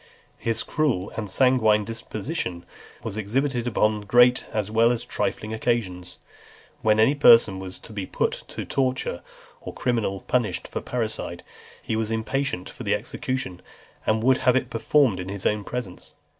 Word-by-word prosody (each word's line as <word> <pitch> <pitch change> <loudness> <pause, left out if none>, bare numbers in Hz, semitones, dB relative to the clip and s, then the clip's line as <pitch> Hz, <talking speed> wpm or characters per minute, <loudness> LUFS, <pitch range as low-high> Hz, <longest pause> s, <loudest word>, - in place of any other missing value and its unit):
XXXIV. - - -29
His 115 -1 +1
cruel 130 -11 0
and 105 -3 -4
sanguinary 110 -3 +3
disposition 110 - -4 0.4
was 100 - -4
exhibited 120 +4 -1
upon 105 -2 +1
great 120 +4 +4
as 105 -1 -2
well 115 +1 +4
as 120 - -2
trifling 110 +1 -2
occasions. 95 -6 -2 0.6
When 110 0 +3
any 115 +6 +5
person 115 -8 +6
was 95 -1 -7
to 110 - -12
be 100 -3 -4
put - - -1
to - - -13
the - - -4
torture, 130 -9 -1 0.4
or - - -7
criminal 115 -6 -1
punished 115 -8 -1
for - - -4
parricide, 110 -7 -3 0.4
he 110 - -2
was 110 -1 -1
impatient 115 -3 -2
for - - -11
the - - +1
execution, 130 -9 -4 0.4
and 110 0 +1
would 130 +1 +5
have 130 -1 +3
it 130 - 0
performed 115 -3 +2
in 90 +1 -5
his 100 -1 -5
own 105 -1 +1
presence. 110 -6 -6
110 Hz, 165 wpm, -25 LUFS, 100-125 Hz, 0.6 s, person